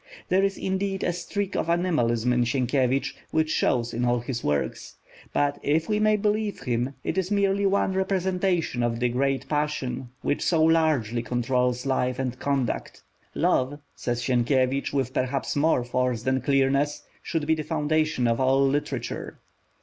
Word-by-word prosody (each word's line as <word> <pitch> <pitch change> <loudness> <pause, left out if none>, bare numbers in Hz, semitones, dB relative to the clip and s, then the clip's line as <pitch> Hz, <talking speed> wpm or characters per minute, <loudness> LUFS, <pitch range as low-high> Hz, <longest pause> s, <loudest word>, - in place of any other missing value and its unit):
There 190 +1 +3
is 195 0 0
indeed 195 0 -2
a 175 - +1
streak 195 +3 -3
of 165 - -1
animalism 125 -9 +1
in 125 0 +3
Sienkiewicz, 130 +2 +1 0.2
which 155 0 +1
shows 120 -2 +1
in 120 - -1
all 120 0 +2
his 120 0 -4
works; 75 -1 -2 0.4
but, 145 0 0
if 155 +3 +1
we 210 -1 +1
may 215 0 +4
believe 210 0 -1
him, 125 +2 -1
it 190 - -1
is 185 -1 -2
merely 200 -1 +2
one 195 -1 +1
representation 185 -6 0
of 120 -1 0
the 125 0 +1
great 135 +2 0
passion, 145 -4 -2
which 145 - 0
so 165 -3 +2
largely 155 -8 +2
controls 125 +1 0
life 130 -2 0
and 125 -2 -3
conduct. 140 -4 -2 0.3
Love, 130 +3 +1 0.2
says 120 -1 -2
Sienkiewicz, 130 +2 +1
with 130 -3 -1
perhaps 130 +1 -1
more 145 -3 +2
force 125 -1 -1
than 130 +1 +1
clearness, 140 +2 +1 0.2
should 160 -3 -2
be 160 - +3
the 155 - -1
foundation 155 -4 0
of 115 0 +1
all 135 +1 +3
literature. 140 -3 -3
140 Hz, 160 wpm, -25 LUFS, 125-165 Hz, 0.4 s, may